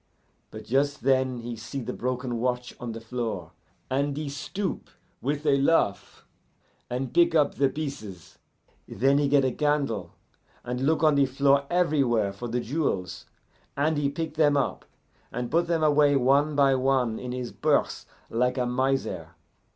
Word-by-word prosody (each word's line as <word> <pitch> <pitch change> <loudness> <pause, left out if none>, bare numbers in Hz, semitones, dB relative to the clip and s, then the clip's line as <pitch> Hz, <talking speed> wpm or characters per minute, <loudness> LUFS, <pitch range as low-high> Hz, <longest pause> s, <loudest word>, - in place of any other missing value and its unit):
But 110 0 -9
just 140 +4 0
then 130 -2 +1
he 120 0 -5
see 115 +5 -6
the 125 0 -5
broken 125 -1 -3
watch 125 0 -2
on 120 -1 -5
the 115 - -6
floor, 115 -7 -4 0.4
and 140 +2 -1
he 150 -1 -3
stoop, 185 +7 -4 0.3
with 145 +3 -2
a 140 -2 +3
laugh, 140 -9 +1 0.6
and 125 +1 -3
pick 170 -1 +4
up 150 -3 +3
the 140 -1 +2
pieces; 110 - -7 0.5
then 135 +6 +2
he 145 - +2
get 140 -1 +3
a 130 - +1
candle 135 - -1 0.5
and 125 +1 -4
look 155 +3 +1
on 155 -1 +5
the 140 -1 +3
floor 140 +1 +2
everywhere 135 - +2
for 120 +5 -6
the 120 +1 -1
jewels, 95 - -2 0.5
and 155 +3 +2
he 145 -1 +1
pick 160 +2 -4
them 150 -2 +3
up, 140 - -1 0.5
and 125 -1 -4
put 170 +1 +2
them 165 -2 0
away 145 -1 +4
one 140 +3 +3
by 140 -1 +4
one 130 -3 +1
in 125 -1 -5
his 125 -1 -4
purse - - 0 0.2
like 125 +3 0
a 125 - +1
miser. 125 -10 -1
135 Hz, 165 wpm, -26 LUFS, 120-145 Hz, 0.6 s, on